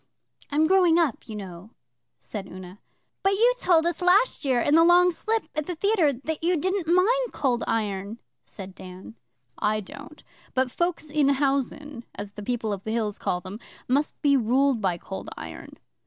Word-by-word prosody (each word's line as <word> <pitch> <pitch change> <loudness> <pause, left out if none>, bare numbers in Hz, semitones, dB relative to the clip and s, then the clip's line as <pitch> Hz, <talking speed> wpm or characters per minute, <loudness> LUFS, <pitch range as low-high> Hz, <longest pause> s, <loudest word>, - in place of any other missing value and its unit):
I'm 300 +2 +2
growing 355 -1 +4
up, 320 -9 0
you 215 - -6
know,' 190 0 -9 0.4
said 205 -3 -7
Una. 185 +1 -11 0.4
'But 390 +1 +2
you 470 +5 +4
told 335 -3 +3
us 345 +2 -1
last 365 +6 +3
year, 260 -3 +2
in 290 - +1
the 325 +1 +7
Long 355 +1 +5
Slip 440 +6 -1
at 305 -1 -3
the 355 - -3
theatre 375 -4 +2
that 300 +5 -5
you 350 +1 +2
didn't 375 +1 -1
mind 465 +7 +3
Cold 250 -4 0
Iron,' 205 -1 -2 0.3
said 190 -2 -10
Dan. 185 +3 -11 0.5
'I 215 0 +1
don't; 285 +8 -12 0.3
but 260 -1 +1
folks 345 -2 -2
in 295 -2 +3
housen, 275 -1 -1
as 205 0 -6
the 210 - -9
People 225 -1 -2
of 195 -1 -6
the - - -5
Hills 220 -3 -2
call 180 - -1
them, 195 +3 -8 0.3
must 280 +4 0
be 285 -1 +4
ruled 260 0 +2
by 185 -4 0
Cold 190 +3 -7
Iron. - - -9
280 Hz, 180 wpm, -25 LUFS, 215-340 Hz, 0.5 s, the